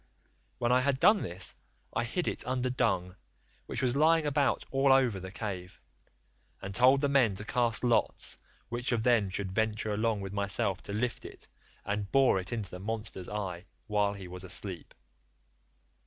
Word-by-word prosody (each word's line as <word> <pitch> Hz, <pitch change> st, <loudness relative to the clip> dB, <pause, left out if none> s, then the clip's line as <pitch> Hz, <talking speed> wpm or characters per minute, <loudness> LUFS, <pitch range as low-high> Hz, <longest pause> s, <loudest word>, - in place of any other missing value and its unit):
When 120 Hz, -1 st, 0 dB
I 125 Hz, +1 st, +5 dB
had 135 Hz, 0 st, +1 dB
done 210 Hz, +3 st, +5 dB
this 90 Hz, +1 st, -2 dB, 0.4 s
I 120 Hz, -, 0 dB
hid 175 Hz, +9 st, -2 dB
it -, -, -1 dB
under 130 Hz, 0 st, 0 dB
dung, 95 Hz, -7 st, 0 dB, 0.5 s
which -, -, -3 dB
was 125 Hz, 0 st, +2 dB
lying 160 Hz, +2 st, +4 dB
about 145 Hz, -1 st, +1 dB
all 135 Hz, 0 st, +3 dB
over 130 Hz, -7 st, +4 dB
the 95 Hz, 0 st, -8 dB
cave, 95 Hz, -4 st, -6 dB, 0.8 s
and 95 Hz, +1 st, -6 dB
told 130 Hz, +5 st, +5 dB
the 145 Hz, -, +2 dB
men 130 Hz, -8 st, +3 dB
to 105 Hz, -, -6 dB
cast 120 Hz, -3 st, +1 dB
lots 120 Hz, -2 st, +1 dB, 0.3 s
which 120 Hz, +2 st, -2 dB
of 115 Hz, -2 st, +1 dB
them 115 Hz, -5 st, +3 dB
should 95 Hz, 0 st, -4 dB
venture 110 Hz, +1 st, 0 dB
along 110 Hz, 0 st, 0 dB
with 95 Hz, 0 st, -6 dB
myself 100 Hz, -1 st, 0 dB
to -, -, -2 dB
lift 115 Hz, +4 st, -2 dB
it -, -, -10 dB, 0.4 s
and 100 Hz, -1 st, -3 dB
bore 135 Hz, -7 st, +4 dB
it 95 Hz, +1 st, -4 dB
into 110 Hz, -6 st, -4 dB
the 90 Hz, -, -7 dB
monster's 105 Hz, -3 st, -4 dB
eye 95 Hz, -4 st, -4 dB, 0.2 s
while 105 Hz, -2 st, +1 dB
he 95 Hz, -2 st, -8 dB
was 90 Hz, +1 st, -7 dB
asleep. 95 Hz, -1 st, -3 dB
110 Hz, 175 wpm, -30 LUFS, 95-125 Hz, 0.8 s, I